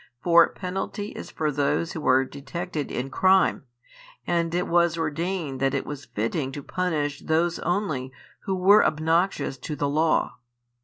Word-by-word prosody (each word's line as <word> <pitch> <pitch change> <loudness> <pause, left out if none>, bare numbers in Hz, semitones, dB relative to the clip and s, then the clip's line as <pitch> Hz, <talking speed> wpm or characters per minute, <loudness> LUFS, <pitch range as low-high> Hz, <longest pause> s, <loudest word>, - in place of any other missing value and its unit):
For 170 -1 +6
penalty 195 +2 -4
is - - -8
for 155 -1 -1
those 145 +4 0
who 160 - -5
are 130 +1 +4
detected 150 +3 -5
in 130 +2 -3
crime, 190 -1 +3 0.6
and 170 -1 0
it 180 - 0
was 170 -1 +2
ordained 160 -2 -2
that 135 +1 +1
it 135 - -2
was 145 -1 -7
fitting 130 +6 -2
to 145 - -6
punish 150 -6 -2
those 165 +2 0
only 160 -8 -2 0.3
who 195 - 0
were 195 +3 +6
obnoxious 160 -2 0
to 150 +4 -5
the 145 0 -1
law. 155 +3 +1
160 Hz, 155 wpm, -25 LUFS, 140-175 Hz, 0.6 s, For